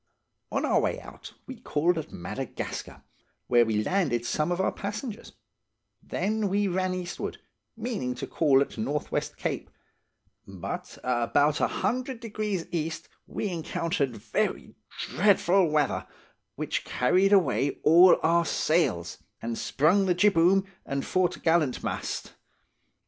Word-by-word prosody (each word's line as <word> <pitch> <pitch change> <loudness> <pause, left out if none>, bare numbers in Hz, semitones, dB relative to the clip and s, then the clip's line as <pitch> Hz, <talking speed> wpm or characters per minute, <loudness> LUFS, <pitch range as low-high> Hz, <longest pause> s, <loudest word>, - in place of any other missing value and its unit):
"On - - 0
our - - +3
way - - -1
out, - - -12
we 260 -2 -8
called 170 +1 +1
at 160 -2 -5
Madagascar, 85 - -6 0.4
where 120 -1 +5
we 110 -2 0
landed 135 - 0
some 150 +7 0
of 175 - -1
our 190 - +2
passengers; 210 +3 -6 0.7
then 210 0 -1
we 200 +1 +1
ran 185 0 0
eastward, 180 -1 -5 0.4
meaning 215 - -3
to - - -5
call 140 -4 +3
at 140 - -3
North 145 +7 -2
West - - -2
Cape; - - -3 0.8
but 95 -3 -6
about 125 +5 +2
a - - +4
hundred 255 0 -2
degrees 210 -5 -3
east 160 -1 -3 0.2
we 210 - -3
encountered 160 -5 -2
very 105 - -2 0.4
dreadful 190 -2 +3
weather, 150 -1 0 0.5
which - - -2
carried 185 +10 +2
away 175 -8 +3
all 175 +4 +7
our 170 +1 +4
sails, 155 - 0 0.2
and 115 0 -3
sprung 180 - +2
the 180 - +3
jibboom 190 0 +4 0.2
and 140 0 -3
foret'gallantmast. 170 -6 0
170 Hz, 125 wpm, -27 LUFS, 140-195 Hz, 0.8 s, all